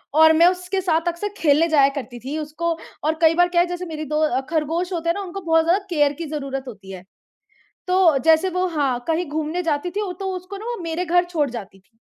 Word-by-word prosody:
और 320 0 +7
मैं 335 +2 +6
उसके 365 +1 -1
साथ 330 -2 0
अक्सर 345 +4 -2
खेलने 310 0 +3
जाया 280 -3 +5
करती 250 -3 -6
थी। 270 +6 -5
उसको 310 +3 -3 0.3
और 310 +1 +2
कई 325 0 +6
बार 350 +1 +4
क्या 345 -1 +3
है 350 - +1
जैसे 355 +1 -5
मेरी 310 -2 -5
दो 300 -4 +1
खरगोश 330 +3 -1
होते 335 -1 -2
हैं - - +3
ना, 405 - -4
उनको 390 0 -6
बहुत 325 -2 +3
ज़्यादा 375 +4 +2
केयर 295 -4 +2
की - - -3
जरूरत 270 -2 -4
होती 200 -5 -10
है। 185 -1 -9 0.8
तो 365 -5 +4
जैसे 325 +3 +4
वो 365 +1 -1
हाँ, 285 -7 0
कहीं 330 +2 0
घूमने 315 +3 -2
जाती 310 +1 -1
थी 400 -1 -3
तो 385 -1 -2
उसको 365 +2 -7
ना 425 - -9
वो 480 0 -3
मेरे 335 +2 -2
घर 355 +1 +3
छोड़ 315 -5 -1
जाती 200 -5 -8
थी। 210 +4 -36
325 Hz, 235 wpm, -22 LUFS, 295-360 Hz, 0.8 s, और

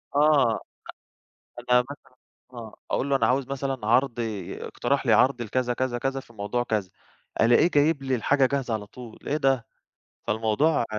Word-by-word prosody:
آه، 145 -6 +4
أ - - -5 1.1
أنا 125 - +7
مثلًا 145 -2 -12 0.4
آه، 115 -3 -9 0.2
أقول 140 - 0
له 135 - +3
أنا - - +2
عاوز 130 +1 +1
مثلًا 135 -4 -3
عرض، 120 0 +2 0.4
اقترح 135 +2 -2
لي 115 - +4
عرض 125 +3 +3
لكذا 125 +2 -1
كذا 125 -1 -2
كذا 135 +2 -2
في 120 - -15
موضوع 110 +4 -2
كذا، 105 -5 -2 0.5
ألاقيه 120 +8 +5
جايب 145 -1 +2
لي 130 -1 0
الحاجة 130 +4 +2
جاهزة 130 -3 -1
على 105 -2 -3
طول، 120 -1 -12
إيه 150 - 0
ده! 135 -5 +1 0.6
فالموضوع 115 +7 +1
125 Hz, 165 wpm, -25 LUFS, 115-140 Hz, 1.1 s, أنا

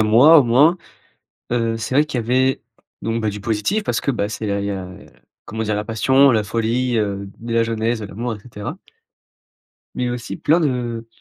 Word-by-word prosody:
mois 125 +10 +7
au - - +6
moins, 140 +9 +4 0.8
heu, 115 -1 0
c'est 120 +4 -3
vrai 150 - +5
qu'il 140 -5 -3
y 115 - -3
avait, 130 +3 +1 0.4
donc, 115 0 -2
bah, 110 - 0
du 105 0 -6
positif, 115 - -1
parce - - -1
que, 140 - 0
bah, 105 -5 -1
c'est 110 +1 -5
là 100 -1 -1
il 100 - -3
y 100 - -2
a, 95 -2 -4
heu, 90 0 -12 0.4
comment 110 +1 -4
dire? 105 -1 -1
La 105 0 -3
passion, 130 +5 +4
la 110 -2 +2
folie, 115 +3 0
heu, 100 -2 -2
de 115 0 -5
la 115 0 +3
jeunesse, 115 0 -1
de 105 - -5
l'amour 115 +3 -4
et - - -12
cetera 115 - -7 1.2
mais 125 - -1
aussi 120 -1 -5
plein 165 +4 +2
de 120 -5 -2
115 Hz, 215 wpm, -20 LUFS, 105-125 Hz, 1.2 s, mois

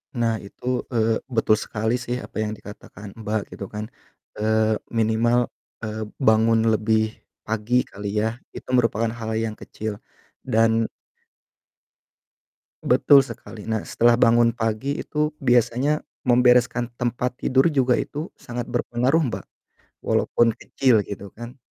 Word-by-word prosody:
Nah 115 -2 0
itu, 125 +5 -4
eee, 115 -1 +2
betul 115 -4 +2
sekali 110 +1 -2
sih 125 0 -3
apa - - -13
yg 110 0 -1
dikatakan 105 0 -11
Mbak 110 0 -1
gitu 100 - -6
kan. 105 0 -5 0.5
Eee, 110 0 +2 0.2
minimal, 115 +2 +3 0.4
eee, 110 0 -3 0.2
bangun 110 +1 +5
lebih 110 0 +1 0.3
pagi 110 +2 -1
kali 100 0 -7
ya, 110 - +1 0.3
itu - - -9
merupakan 115 -1 +2
hal 110 0 -4
yang 110 -1 -2
kecil 110 -1 -6 0.5
dan 115 0 +3 2.0
Betul 140 -2 +6
sekali. 115 -3 -10
Nah 110 -1 -1
setelah 120 +1 +3
bangun 115 0 +5
pagi 115 +5 -2
itu 150 0 -1
biasanya 125 +3 +2 0.3
membereskan 125 0 +4
tempat 125 +1 -1
tidur 130 +3 +3
juga 130 -3 +3
itu 155 +5 -4
sangat 120 0 -6
berpengaruh 130 +7 +1
Mbak, - - -5 0.5
walaupun 115 -1 +2
kecil 120 -2 +2
gitu 100 0 -7
kan. 120 +4 -9
115 Hz, 125 wpm, -23 LUFS, 110-125 Hz, 2.0 s, Betul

